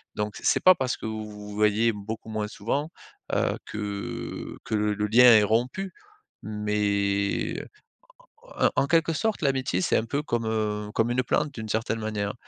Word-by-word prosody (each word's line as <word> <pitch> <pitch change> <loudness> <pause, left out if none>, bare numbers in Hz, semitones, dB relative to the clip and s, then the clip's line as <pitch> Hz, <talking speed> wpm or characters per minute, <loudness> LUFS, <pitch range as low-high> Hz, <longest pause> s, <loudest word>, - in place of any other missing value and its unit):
donc 105 0 -3
c'est - - +3
pas 185 0 +7
parce 130 -4 -1
que - - -8
vous 110 -1 -4
vous 105 0 -9
voyez 105 +2 +3
beaucoup 110 +2 -7
moins 105 -1 -2
souvent, 140 +10 -2 0.4
heu, - - +1
que 100 -1 -5
que - - -1
le 105 0 +1
le 105 +1 -1
lien 120 +4 +6
est 115 -4 +8
rompu 125 - 0 0.5
mais 100 -1 0 0.9
en - - -2
en - - -1
en 140 - +2
quelque 165 0 +3
sorte, 220 +6 -1
l'amitié 130 -8 +1
c'est - - +1
un - - +1
peu 140 +6 -2
comme, 120 -5 -1
heu, 105 -1 -1
comme 115 +2 +2
une 125 +1 +1
plante, 145 +4 0
d'une 110 -1 -7
certaine 115 +1 -1
manière. 105 -2 -2
110 Hz, 180 wpm, -26 LUFS, 105-125 Hz, 0.9 s, est